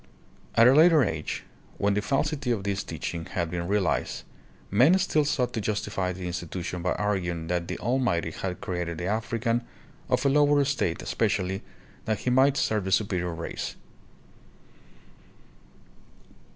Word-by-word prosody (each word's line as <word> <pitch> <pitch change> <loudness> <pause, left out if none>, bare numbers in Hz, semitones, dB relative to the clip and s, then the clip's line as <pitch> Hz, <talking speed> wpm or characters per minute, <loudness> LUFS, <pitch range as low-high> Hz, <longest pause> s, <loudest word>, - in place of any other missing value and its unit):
At 115 +1 +7
a 130 - +7
later 160 0 +6
age, 80 -7 -3 0.3
when 100 0 +2
the 105 - +1
falsity 140 +4 -1
of 115 -5 0
this 100 0 -1
teach 80 0 -5
ing 85 -1 -5
had 85 -3 -3
been 85 -1 -3
realized, 100 -1 0 0.5
men 130 - +6
still 180 -5 +2
sought 130 -4 0
to 115 - -2
justify 100 -3 -1
the 90 0 -6
institution 90 0 -4
by 90 - 0
arguing 90 -5 -1
that 90 -1 -1
the - - -4
Almighty 115 -7 0
had 90 +2 -5
created 90 -3 -3
the 90 - -4
African 115 +3 0 0.5
of 130 - +1
a - - +5
lower 145 0 +4
state 135 - -1
especially 100 -3 0 0.4
that 110 -1 -1
he 125 - 0
might 135 +2 +4
serve 105 -3 0
the 95 - -2
superior 90 -3 +1
race. 80 - -5
100 Hz, 150 wpm, -27 LUFS, 90-125 Hz, 0.5 s, At